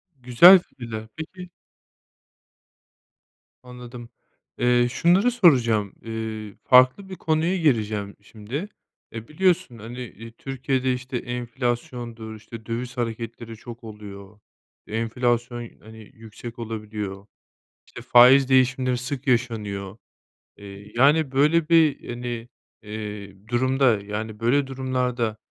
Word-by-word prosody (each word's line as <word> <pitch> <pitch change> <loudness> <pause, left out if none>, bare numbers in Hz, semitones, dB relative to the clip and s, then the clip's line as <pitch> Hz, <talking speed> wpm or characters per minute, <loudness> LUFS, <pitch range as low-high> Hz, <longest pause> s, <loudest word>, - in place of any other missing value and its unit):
Güzel 135 +9 +8
fikirler, 115 -8 -8
peki 180 +3 -8 2.1
Anladım, 125 -1 -10 0.5
eee, 120 0 +3
şunları 185 - +3
soracağım, 120 - +3
eee, 110 -2 -6
farklı 130 +10 +5
bir 190 - -6
konuya 165 +3 0
gireceğim 110 - 0
şimdi. 115 - -7 0.4
Eee, 115 0 -8
biliyorsun, 180 -5 +1
hani, 120 +4 -8
eee, 115 -2 -9
Türkiye'de, 130 +1 -2
işte, 125 0 -4
enflasyondur, 120 -2 -4
işte, 110 +1 -11
döviz 120 +2 -5
hareketleri 115 -1 -5
çok 120 +2 -11
oluyor. 105 -2 -11 0.5
Enflasyon, 120 +1 -1
hani, 110 0 -14
yüksek 115 +2 -11
olabiliyor, 105 -3 -6 0.6
İşte, - - -11
faiz 125 +2 +7
değişimleri 130 -1 +2
sık 130 +2 -5
yaşanıyor. 105 -6 -1 0.6
Eee, 100 0 -12
yani, 145 +2 +4
böyle 150 +4 +3
bir, 160 -3 +3
hani, 120 -1 -5 0.3
eee, 105 -1 -8
durumda, 130 -2 +2
yani 105 +1 -5
böyle 135 +5 +2
durumlarda, 125 -4 -2
120 Hz, 105 wpm, -24 LUFS, 110-130 Hz, 2.1 s, Güzel